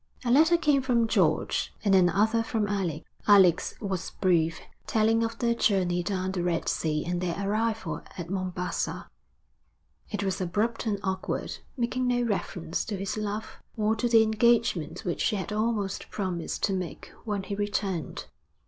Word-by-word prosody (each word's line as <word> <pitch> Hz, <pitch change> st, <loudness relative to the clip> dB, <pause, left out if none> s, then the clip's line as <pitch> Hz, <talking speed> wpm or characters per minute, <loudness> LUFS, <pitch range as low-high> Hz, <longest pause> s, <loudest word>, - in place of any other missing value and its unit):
A 240 Hz, -, +2 dB
letter 320 Hz, +6 st, +6 dB
came 295 Hz, -4 st, +3 dB
from 240 Hz, -3 st, +2 dB
George, 180 Hz, -8 st, +1 dB
and 200 Hz, -, +4 dB
another 200 Hz, +5 st, +4 dB
from 225 Hz, -2 st, -1 dB
Alec. 185 Hz, -6 st, -2 dB, 0.2 s
Alec's 190 Hz, -5 st, +5 dB
was 195 Hz, -4 st, -3 dB
brief, 165 Hz, -4 st, +2 dB, 0.3 s
telling 225 Hz, +1 st, +3 dB
of 225 Hz, 0 st, -3 dB
their 235 Hz, 0 st, +1 dB
journey 185 Hz, -6 st, +2 dB
down 185 Hz, +1 st, -2 dB
the 185 Hz, -2 st, -2 dB
Red 175 Hz, -1 st, -1 dB
Sea 150 Hz, -2 st, 0 dB
and 175 Hz, +1 st, -2 dB
their 175 Hz, -2 st, -1 dB
arrival 205 Hz, -5 st, -1 dB, 0.2 s
at 175 Hz, -2 st, -5 dB
Mombassa; 180 Hz, -1 st, -3 dB, 1.0 s
it 205 Hz, -2 st, -3 dB
was 190 Hz, -1 st, -1 dB
abrupt 215 Hz, +6 st, -1 dB
and 205 Hz, -2 st, +1 dB
awkward, 190 Hz, -1 st, -3 dB, 0.2 s
making 250 Hz, +1 st, 0 dB
no 245 Hz, 0 st, +2 dB
reference 180 Hz, -6 st, -2 dB
to 205 Hz, -, -3 dB
his 195 Hz, 0 st, -3 dB
love, 215 Hz, 0 st, -4 dB, 0.2 s
or 215 Hz, 0 st, +2 dB
to 240 Hz, +2 st, 0 dB
the 225 Hz, -1 st, +6 dB
engagement 220 Hz, -5 st, +1 dB
which 175 Hz, -, -2 dB
she -, -, +2 dB
had 195 Hz, +1 st, -3 dB
almost 215 Hz, -3 st, -1 dB
promised 185 Hz, -5 st, -3 dB
to 195 Hz, -, +2 dB
make 185 Hz, -3 st, -5 dB
when 205 Hz, -4 st, -2 dB
he 200 Hz, -, -5 dB
returned. 200 Hz, -4 st, -2 dB
200 Hz, 160 wpm, -28 LUFS, 180-225 Hz, 1.0 s, letter